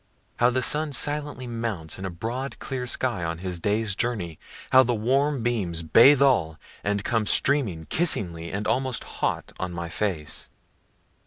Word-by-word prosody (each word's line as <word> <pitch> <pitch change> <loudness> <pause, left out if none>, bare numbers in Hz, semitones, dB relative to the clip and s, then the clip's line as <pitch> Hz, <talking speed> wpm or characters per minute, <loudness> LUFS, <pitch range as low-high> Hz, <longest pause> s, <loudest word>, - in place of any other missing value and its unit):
How 120 - +4
the 130 +1 0
sun 150 +2 0
silently 145 -1 -1
mounts 115 -9 -4
in 95 - -5
the - - -2
broad 115 +10 -4
clear 125 -2 -4
sky, 120 -6 -2
on 85 0 -2
his 90 0 -4
day's 105 +2 0
journey! 100 -9 -2 0.3
How 130 - +8
the 120 -2 +1
warm 135 +4 +1
beams 95 -9 -1
bathe 130 - +7
all, 85 - +2 0.3
and 100 0 0
come 110 -2 0
streaming 110 - +1
kissingly 85 - +1
and 105 +3 -3
almost 130 -2 0
hot - - -3
on 90 -1 -3
my 85 0 -5
face. 90 -5 -3
115 Hz, 160 wpm, -25 LUFS, 90-130 Hz, 0.3 s, How